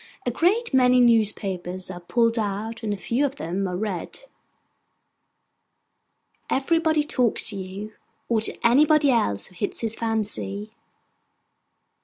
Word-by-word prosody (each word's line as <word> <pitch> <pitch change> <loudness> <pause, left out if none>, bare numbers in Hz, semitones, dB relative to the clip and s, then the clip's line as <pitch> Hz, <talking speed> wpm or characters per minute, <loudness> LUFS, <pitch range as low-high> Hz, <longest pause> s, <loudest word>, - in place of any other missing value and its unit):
A 245 - 0
great 370 - +1
many 250 -1 +4
newspapers 195 -6 +1
are 175 - -8
pulled 230 +6 +1
out, 215 +2 -4
and 220 -2 -3
a 205 - -2
few 235 +8 -1
of 280 -1 -1
them 190 - -3
are 180 -1 -4
read. 200 - -4 2.3
Everybody 315 +2 +1
talks 250 -6 +1
to 210 - -2
you, 195 +3 -7 0.3
or 225 -2 +1
to - - +4
anybody 290 +3 +4
else 100 - +1
who - - -10
hits 200 +3 -4
his 225 -2 +1
fancy. 215 -2 -3
225 Hz, 130 wpm, -24 LUFS, 195-255 Hz, 2.3 s, many